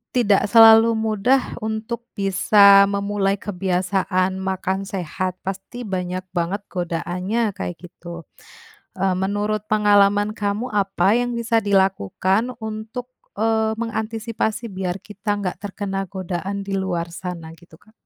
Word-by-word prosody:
tidak 210 Hz, -4 st, +3 dB
selalu 225 Hz, 0 st, +8 dB
mudah 220 Hz, +4 st, +2 dB, 0.2 s
untuk 220 Hz, +2 st, -4 dB
bisa 200 Hz, 0 st, +6 dB
memulai 200 Hz, 0 st, 0 dB
kebiasaan 185 Hz, -1 st, -1 dB
makan 190 Hz, 0 st, -2 dB
sehat, 185 Hz, 0 st, -3 dB
pasti 195 Hz, +6 st, -6 dB
banyak 185 Hz, -1 st, -3 dB
banget 180 Hz, +3 st, -1 dB
godaannya 180 Hz, +5 st, -2 dB
kayak 175 Hz, -, -4 dB
gitu, 170 Hz, -1 st, -10 dB, 0.7 s
eee, 190 Hz, -1 st, +1 dB
menurut 205 Hz, +2 st, -1 dB
pengalaman 205 Hz, 0 st, +4 dB
kamu 205 Hz, +3 st, -2 dB
apa 195 Hz, -1 st, +2 dB
yang 245 Hz, 0 st, -2 dB
bisa 230 Hz, -1 st, +1 dB
dilakukan 195 Hz, -, +1 dB
untuk, 220 Hz, +3 st, -6 dB, 0.3 s
eee, 220 Hz, 0 st, +1 dB
mengantisipasi 225 Hz, 0 st, -3 dB
biar 185 Hz, -1 st, -3 dB
kita 205 Hz, 0 st, -3 dB
nggak 185 Hz, -3 st, -3 dB
terkena 195 Hz, -1 st, -4 dB
godaan 190 Hz, +1 st, -4 dB
di 195 Hz, -, -4 dB
luar 175 Hz, -3 st, -2 dB
sana 170 Hz, -3 st, -6 dB
gitu 170 Hz, 0 st, -18 dB
Kak? 215 Hz, -, -24 dB
200 Hz, 120 wpm, -21 LUFS, 185-220 Hz, 0.7 s, selalu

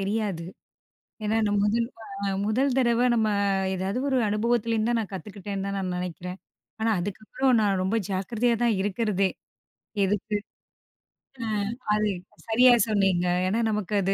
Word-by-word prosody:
தெரியாது. 195 Hz, -4 st, -1 dB, 0.8 s
ஏன்னா 215 Hz, +1 st, +1 dB
நம்ம 205 Hz, 0 st, +1 dB
வந்து 225 Hz, +3 st, +1 dB, 0.5 s
அ -, -, +1 dB, 0.2 s
முதல் 255 Hz, +6 st, +2 dB
தடவ 240 Hz, -2 st, +3 dB
நம்ம 220 Hz, -2 st, +2 dB, 0.5 s
ஏதாவது 190 Hz, +4 st, -2 dB
ஒரு 265 Hz, -2 st, +2 dB
அனுபவத்திலேருந்து 225 Hz, +1 st, +1 dB
தான் 235 Hz, -, +2 dB
நான் 210 Hz, -3 st, -4 dB
கத்துக்கிட்டேன்னு, 195 Hz, 0 st, -5 dB
தான் 200 Hz, -, -3 dB
நான் 185 Hz, -1 st, -2 dB
நினக்கிறேன். 180 Hz, +1 st, -5 dB, 0.4 s
ஆனா 225 Hz, -, +1 dB
அதுக்கப்புறம் 215 Hz, +7 st, -1 dB
நான் 195 Hz, -3 st, +2 dB
ரொம்ப 190 Hz, +4 st, 0 dB
ஜாக்கிரதயா 225 Hz, +5 st, 0 dB
தான் 235 Hz, -3 st, +3 dB
இருக்கறதே. 200 Hz, -1 st, +1 dB, 0.8 s
எதுக்கு 210 Hz, +2 st, -1 dB, 1.1 s
ஆ, -, -, -3 dB, 0.5 s
அது 215 Hz, 0 st, +2 dB, 0.4 s
சரியா 245 Hz, +3 st, +6 dB
சொன்னீங்க. 195 Hz, -5 st, +2 dB, 0.2 s
ஏன்னா 210 Hz, +5 st, +1 dB
நமக்கு 210 Hz, -2 st, -2 dB
அது 195 Hz, +1 st, +1 dB
210 Hz, 135 wpm, -26 LUFS, 195-230 Hz, 1.1 s, சரியா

